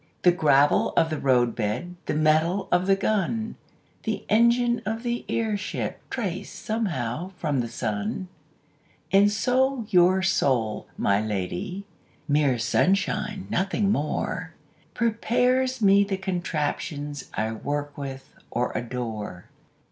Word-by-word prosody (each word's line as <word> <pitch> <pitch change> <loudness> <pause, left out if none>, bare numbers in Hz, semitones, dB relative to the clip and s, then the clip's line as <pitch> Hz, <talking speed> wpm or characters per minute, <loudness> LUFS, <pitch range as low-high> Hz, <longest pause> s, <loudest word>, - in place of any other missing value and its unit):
The 180 - +7
gravel 145 -5 +3
of 160 -1 +3
the 155 - -2
roadbed, 120 +4 +1
The - - 0
metal 160 +5 +2
of 180 +1 +2
the 195 - +5
gun, 215 +2 -1 0.5
The 220 -2 -3
engine 235 +2 +3
of 225 +2 -3
the 240 0 -2
airship 215 -4 -2
Trace - - -3
somehow 180 - -3
from 150 -6 0
the 120 - -1
sun. 110 - -3 0.8
And 200 +2 +5
so 255 +3 +1
your 185 0 +4
soul, 120 - +1
my 100 +1 +2
lady 105 - -3 0.4
(Mere 145 -4 +3
sunshine, 195 - +1
nothing 195 +2 +1
more) 150 -5 -2 0.4
Prepares 250 +2 +1
me 200 0 +6
the 195 -1 -2
contraptions 150 -6 -3
I 110 +1 -1
work 145 +5 -3
with 135 -2 -7 0.2
or 125 +1 -1
adore. 115 -7 -5
175 Hz, 120 wpm, -25 LUFS, 135-210 Hz, 0.8 s, The